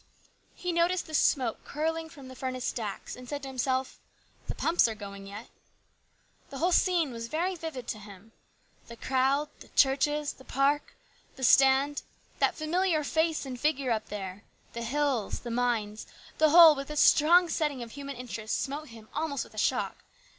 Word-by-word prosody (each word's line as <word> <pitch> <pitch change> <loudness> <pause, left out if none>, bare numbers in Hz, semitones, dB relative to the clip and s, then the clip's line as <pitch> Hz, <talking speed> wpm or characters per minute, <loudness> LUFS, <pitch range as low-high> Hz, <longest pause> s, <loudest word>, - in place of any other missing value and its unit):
He 360 - -3
noticed 345 +1 +1
the 315 - -11
smoke 255 -6 +1
curling 320 +2 -3
from 280 -5 -12
the 260 - -11
furnace 255 -1 -4
stacks, 215 -4 -4
and 250 0 -12
said 290 -1 -4
to - - -5
himself, 260 0 -2 0.2
" - - -34
The - - -4
pumps 335 -6 +3
are 225 - -4
going 200 -1 -9
yet." 205 +4 -9 1.0
The 275 - -8
whole 350 +6 +1
scene 345 -5 +2
was 230 -1 -6
very 340 +8 -1
vivid 320 -8 -7
to 215 - -4
him. 205 +1 -13 0.6
The 235 - -10
crowd, 270 +4 +1
the - - -13
churches, 290 +2 +2
the 265 - -17
park, 280 +3 0 0.4
the 265 - -9
stand, 270 +3 +4 0.4
that - - +2
familiar 320 0 +1
face 320 +1 0
and 255 -2 -6
figure 275 -3 0
up 220 -1 -1
there, 195 -1 -6 0.3
the 235 - -5
hills, 260 -2 -1
the 240 - -6
mines, 230 -3 -1 0.3
the 310 - +5
whole 330 0 +9
with 275 0 -6
its 300 -1 -2
strong 345 +4 +6
setting 295 -5 -1
of 230 - -10
human 280 +1 -7
interest 230 -3 -4
smote 290 +3 -4
him 225 -3 -13
almost 300 -3 -2
with - - -16
a - - -5
shock. - - 0
275 Hz, 180 wpm, -29 LUFS, 235-310 Hz, 1.0 s, whole